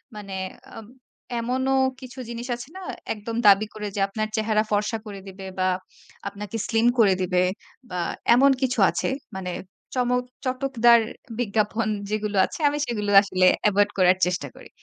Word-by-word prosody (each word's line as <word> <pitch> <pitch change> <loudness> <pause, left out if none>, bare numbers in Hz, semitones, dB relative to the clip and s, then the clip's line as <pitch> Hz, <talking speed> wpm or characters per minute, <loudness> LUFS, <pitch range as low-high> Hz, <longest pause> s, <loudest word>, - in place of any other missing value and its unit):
মানে 200 -2 -7 0.4
উম 215 - -12 0.5
এমনও 260 +3 0 0.3
কিছু 255 +1 -10
জিনিস 235 +1 -6
আছে 240 +2 -9
না 380 - -8 0.3
একদম 225 +1 -6
দাবি 205 +1 +7
করে 210 -1 -5
যে - - -2
আপনার 215 +2 -3
চেহারা 215 -1 +1
ফর্সা 210 +2 +1
করে 205 -2 -7
দিবে 190 0 -9
বা 185 - +2 0.6
আপনাকে 205 +2 -5
স্লিম 225 +1 +2
করে 205 -4 +6
দিবে 180 0 +2 0.5
বা 180 - -3 0.4
এমন 275 +3 +6
কিছু 255 -3 0
আছে। 170 - -1 0.3
মানে 185 -1 -4 0.4
চমক, 250 0 +1 0.2
চটকদার 255 -3 +4 0.4
বিজ্ঞাপন 220 0 0 0.2
যেগুলো 210 -1 -2
আছে - - -8
আমি 290 - -3
সেগুলো 210 -5 -2
আসলে 185 -2 +1 0.2
এভয়েড 205 0 +3
করার 185 0 +5
চেষ্টা 180 -5 -2
করি। - - -14
215 Hz, 155 wpm, -24 LUFS, 200-240 Hz, 0.6 s, দাবি